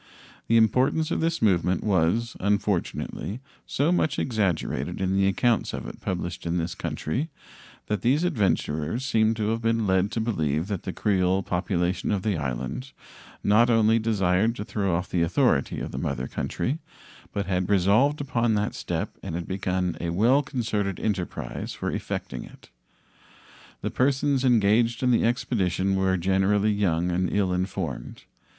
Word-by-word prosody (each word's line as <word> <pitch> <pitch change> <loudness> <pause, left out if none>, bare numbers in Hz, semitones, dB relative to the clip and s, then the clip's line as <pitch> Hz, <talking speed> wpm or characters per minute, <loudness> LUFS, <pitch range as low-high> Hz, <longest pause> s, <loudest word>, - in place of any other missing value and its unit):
The 115 - +4
importance 130 +8 +3
of - - 0
this 165 -4 0
movement 90 -3 +2
was, 105 +5 +1
unfortunately, 100 +2 -1 0.3
so 145 +5 +1
much 155 -5 +1
exaggerated 90 - -1
in 95 0 0
the 95 0 +3
accounts 115 +4 +1
of - - -5
it - - -9
published 90 -1 -3
in 85 +1 0
this 85 0 -2
country 130 - -3 0.6
that 105 - -2
these 135 +7 +2
adventurers 100 - 0
seem 110 -4 +2
to 110 -1 -1
have 115 +1 -1
been 115 -1 +1
led 95 0 +2
to - - -1
believe 80 -9 0
that 100 -4 -2
the 95 - -2
Creole 95 -1 +1
population 90 0 -1
of 100 -3 0
the 105 -3 +1
island 65 - -4 0.5
not 110 +4 +4
only 115 -1 +4
desired 110 0 +1
to 105 - -5
throw 100 -5 -1
off 90 +2 -2
the 90 - 0
authority 85 - +2
of - - -5
the - - -4
mother 65 +2 -2
country, 145 +6 -2 0.5
but 100 - -2
had 90 0 -1
resolved 105 +10 +3
upon 120 -5 +1
that 105 0 0
step - - -3
and - - -5
had 85 0 -4
begun 95 -2 -1
a 85 - -2
well 115 +11 +4
concerted 110 -8 -2
enterprise 100 -5 -3
for - - -3
effecting - - -4
it. - - -15 1.1
The - - -2
persons 135 +1 +1
engaged 115 0 +3
in 125 - +3
the 120 - +3
expedition 95 -5 0
were 95 -1 +2
generally 95 +3 +2
young 90 -4 +1
and 90 +1 0
ill 95 -3 +1
informed. 90 -9 -4
100 Hz, 160 wpm, -26 LUFS, 90-115 Hz, 1.1 s, The